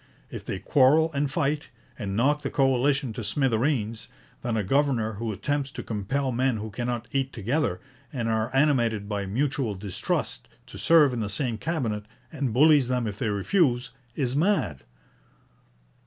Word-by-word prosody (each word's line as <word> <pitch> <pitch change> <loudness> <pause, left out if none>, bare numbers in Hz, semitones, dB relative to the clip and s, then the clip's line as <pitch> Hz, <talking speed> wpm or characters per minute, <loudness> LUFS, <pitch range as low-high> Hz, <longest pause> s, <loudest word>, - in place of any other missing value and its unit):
If - - -7
they - - -4
quarrel 150 - +4
and 140 0 0
fight, 150 0 -1 0.3
and 100 -1 -4
knock 145 +7 +2
the - - -3
coalition 135 -1 +2
to 120 - -5
smithereens, 115 -1 0 0.3
then 120 -2 -1
a 105 - 0
governor 125 -1 +1
who 110 +2 -3
attempts 140 +7 -2
to - - -6
compel 130 +6 -2
men 125 0 +1
who 110 0 -6
cannot 120 +2 -3
eat 135 -1 -1
together, 115 - -1 0.3
and 120 -5 -2
are 110 0 0
animated 120 -7 +2
by 100 -2 -3
mutual 130 0 -1
distrust, 95 -1 -3 0.2
to - - -11
serve 155 -5 +5
in 120 - -2
the 105 -2 -2
same 115 +1 -2
Cabinet, 115 -9 -2 0.3
and 140 -5 -2
bullies 145 +2 +5
them 125 -1 0
if 105 -2 -5
they 115 - 0
refuse, 125 - +1 0.2
is 130 -2 -1
mad.' 145 - +1
125 Hz, 160 wpm, -26 LUFS, 110-140 Hz, 0.3 s, serve